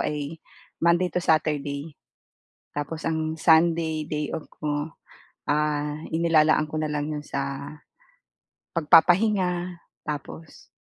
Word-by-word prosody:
ay 150 +1 -3 0.4
Monday 170 +2 +3
to 180 - 0
Saturday, 150 -2 0 0.8
tapos 145 +2 -4
ang 160 0 -1
Sunday 160 -1 +3
day 150 -1 -2
off 160 - -5
ko, 145 0 -1 0.6
ah, 150 0 0
inilalaan 160 -2 +3
ko 155 - -6
nalang 150 -1 -1
'yon 150 - -5
sa 140 +1 -4 1.1
pagpapahinga, 175 +2 +3 0.2
tapos, 150 +1 -7
155 Hz, 100 wpm, -25 LUFS, 150-165 Hz, 1.1 s, Monday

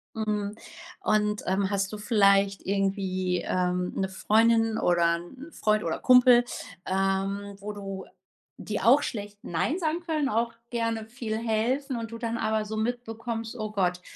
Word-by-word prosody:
Mhm. 210 -2 -2 0.5
Und, 210 0 +1
ähm, 190 +1 +1
hast 200 -1 -1
du - - -4
vielleicht 200 -2 +3
irgendwie, 190 -2 0
ähm, 180 0 0
'ne 190 -1 -1
Freundin 225 +3 +3
oder 170 -1 +3
'n 175 +8 -11
'n - - -24
Freund 215 -5 +1
oder 165 - -2
Kumpel, 250 -1 +7 0.4
ähm, 195 +1 -1
wo 210 +1 -6
du 195 -1 -6 0.5
die 210 - -4
auch 270 +5 +5
schlecht 205 -2 -5
„nein“ 180 - -1
sagen 330 -1 -1
können? 310 -5 -1
Auch 230 +1 0 0.2
gerne 230 -2 -1
viel 225 -1 -4
helfen 235 +5 0
und 230 -1 -5
du 230 - -6
dann 230 0 -3
aber 220 -1 0
so 215 +1 -5
mitbekommst: 225 0 -3
„Oh 215 -1 -4
Gott, 180 -3 0
215 Hz, 155 wpm, -27 LUFS, 195-230 Hz, 0.5 s, Kumpel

